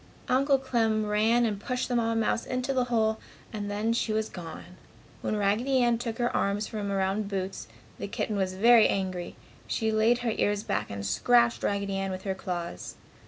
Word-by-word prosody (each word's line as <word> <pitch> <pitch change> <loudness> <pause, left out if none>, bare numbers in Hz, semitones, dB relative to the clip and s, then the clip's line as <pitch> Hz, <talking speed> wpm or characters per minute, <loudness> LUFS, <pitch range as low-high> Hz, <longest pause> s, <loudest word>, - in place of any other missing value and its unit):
Uncle 275 +2 +3
Clem 225 -5 0
ran 220 +3 +3
and 210 -3 -1
pushed 250 +3 -2
the 245 - -1
Mamma 230 -1 +1
mouse 225 0 +1
into 255 +1 -1
the 255 -2 +1
hole 220 -2 +1 0.3
and 205 -1 -4
then 210 +3 0
she 230 -1 0
was 220 0 0
gone. 175 +1 -9 0.5
When - - -1
Raggedy 215 +7 +1
Ann 240 -1 +2
took 230 -2 -4
her 240 0 0
arms 200 +2 0
from 205 -2 -4
around 195 +2 0
Boots, 190 - -4 0.3
the - - -4
kitten 210 +1 -2
was 190 -2 -1
very 230 +3 +6
angry. 185 -2 -3 0.3
She 220 -1 0
laid 220 +2 +3
her 230 - +2
ears 205 -1 0
back - - -2
and 100 0 -5
scratched 235 - +3
Raggedy 200 -1 -1
Ann 195 0 -2
with 185 0 -5
her 195 - -1
claws. 175 - -5
215 Hz, 190 wpm, -28 LUFS, 195-235 Hz, 0.5 s, very